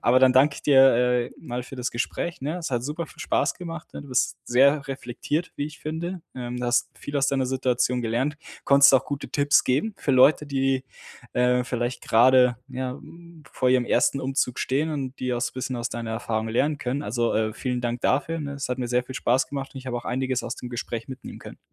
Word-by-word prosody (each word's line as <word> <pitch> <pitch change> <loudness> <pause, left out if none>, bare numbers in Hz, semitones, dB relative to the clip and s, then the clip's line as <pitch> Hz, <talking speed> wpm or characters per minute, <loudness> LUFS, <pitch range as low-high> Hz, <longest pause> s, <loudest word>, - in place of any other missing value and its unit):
Aber, 125 +2 +5
dann 130 0 +5
danke 140 +3 +5
ich - - -10
dir, 135 -2 +6 0.2
äh, 125 0 +1
mal 125 0 -5
für 135 - -10
das 125 0 -2
Gespräch, 170 +8 -3
ne? 150 +5 -2
Es 165 - -5
hat 120 -2 -1
super 150 +5 -3
viel - - -15
spaß 145 - +1
gemacht, 165 -3 -8
ne? - - -6
Du 140 - -13
bist 130 -1 0
sehr 140 +4 +3
reflektiert, 135 +5 -3
wie 145 - -2
ich 150 - -11
finde. 170 +3 -4
Ähm, 125 -1 -5
du 125 - -3
hast 120 0 +2
viel 145 - -8
aus 140 - +2
deiner 135 -1 +1
Situation 125 -1 0
gelernt. 120 +6 -1 0.3
Konntest 140 0 +7
auch 130 - +4
gute 145 -1 -5
Tipps 145 -1 +3
geben 145 +13 +1
für - - -1
Leute, 145 +4 +5
die, 135 -1 0 0.5
äh, 125 0 +2
vielleicht 125 0 -2
gerade, 125 +1 +5
ja, 130 -1 -4
hm, 165 +3 -13
vor 130 - +1
ihrem 125 -1 +3
1. 135 - +2
Umzug 135 -1 -1
stehen 145 +5 0
und 135 -4 -4 0.2
auch 120 - -2
so 120 0 -1
bisschen 130 0 -3
aus 120 0 -3
deiner 115 -1 -5
Erfahrung 110 -1 -2
lernen 145 +6 +1
können. 135 +2 -2
Also, 120 -1 -1
äh, 110 0 +1
vielen 125 0 -2
Dank 120 0 -2
dafür, 145 +5 +1
ne? 140 -2 -4
Es 140 -2 -4
hat 125 - -2
mir 125 -1 -2
sehr 125 +1 +2
viel 130 - -9
Spaß 130 0 +1
gemacht 135 -1 -5
und - - -6
ich 130 - -11
habe 125 -1 -2
auch - - -10
einiges 130 0 -1
aus 120 - -5
dem 125 - -8
Gespräch 115 -1 -5
mitnehmen 130 0 -9
können. - - -11
130 Hz, 230 wpm, -25 LUFS, 125-145 Hz, 0.5 s, Konntest